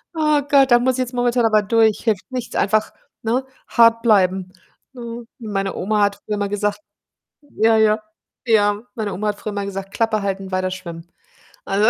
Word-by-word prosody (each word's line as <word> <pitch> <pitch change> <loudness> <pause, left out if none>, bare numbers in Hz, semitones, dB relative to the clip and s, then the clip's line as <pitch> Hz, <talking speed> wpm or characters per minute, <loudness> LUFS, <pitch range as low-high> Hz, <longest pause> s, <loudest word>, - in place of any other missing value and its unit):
Ah 305 -2 +2
Gott, 275 -2 +3
da 240 - +7
muss 255 +2 +1
ich - - -5
jetzt 255 0 -2
momentan 245 -1 +1
aber 215 -1 +4
durch. 220 +1 +3
Hilft 215 -5 0
nichts, 250 -2 -5
einfach, 215 +2 +1 0.3
ne, 245 +4 0 0.2
hart 230 -1 +4
bleiben, 190 -4 +2 0.4
ne? 235 -1 -8
Meine 195 -4 -3
Oma 210 +3 0
hat 200 0 +1
früher 210 - -2
immer 205 -1 -2
gesagt 205 0 -1 0.6
ja, 225 -6 +1
ja, 215 0 +3 0.5
ja, 205 -2 +2
meine 215 -3 -3
Oma 210 +3 -3
hat 205 0 -4
früher 215 - -5
immer 200 -1 -3
gesagt: 195 0 -6
„Klappe 225 -2 0
halten, 195 -1 -4
weiter 185 0 -1
schwimmen.“ 170 -2 -8 0.6
Also 205 +3 +2
215 Hz, 180 wpm, -20 LUFS, 200-235 Hz, 0.6 s, da